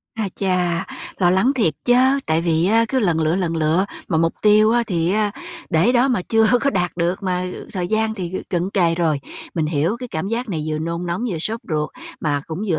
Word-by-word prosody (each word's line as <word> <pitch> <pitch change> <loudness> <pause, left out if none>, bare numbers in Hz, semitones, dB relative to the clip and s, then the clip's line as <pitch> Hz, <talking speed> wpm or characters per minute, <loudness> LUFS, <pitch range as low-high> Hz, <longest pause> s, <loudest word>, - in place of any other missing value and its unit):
A 215 -3 -2
cha, 180 -3 0 0.3
lo 175 -2 +4
lắng 190 +9 +3
thiệt 200 - +1
chớ! 260 +3 +4
Tại 160 +1 +2
vì 165 0 +1
á 225 +3 +4
cứ 265 - +1
lần 175 -7 +1
lựa, 160 +2 +1
lần 170 -3 -1
lựa 160 +4 +2 0.2
mà 160 -4 +1
mục 165 0 +1
tiêu 215 +1 +5
á, 240 0 +3
thì 175 -1 0
á, 210 -1 +1 0.4
để 170 +9 +3
đó 250 +2 +3
mà 245 -7 +1
chưa 225 -1 +4
có 280 - +2
đạt 180 -5 0
được 175 +3 -1
mà 180 -1 -1 0.3
thời 180 -2 -2
gian 220 +1 0
thì 185 -4 -5 0.2
cận 180 0 -1
kề 175 -5 +2
rồi. 160 -4 0 0.3
Mình 160 -3 0
hiểu 160 +7 0
cái 250 - -7
cảm 175 0 -3
giác 235 +1 -2
này 160 -5 -3
vừa 155 0 -1
nôn 170 +2 -3
nóng, 175 +7 -2
vừa 170 - -3
sốt 220 +8 -2
ruột 150 -1 -1 0.3
mà 145 -2 0
cũng 165 +5 -5
vừa 160 - +1
180 Hz, 230 wpm, -21 LUFS, 165-220 Hz, 0.4 s, tiêu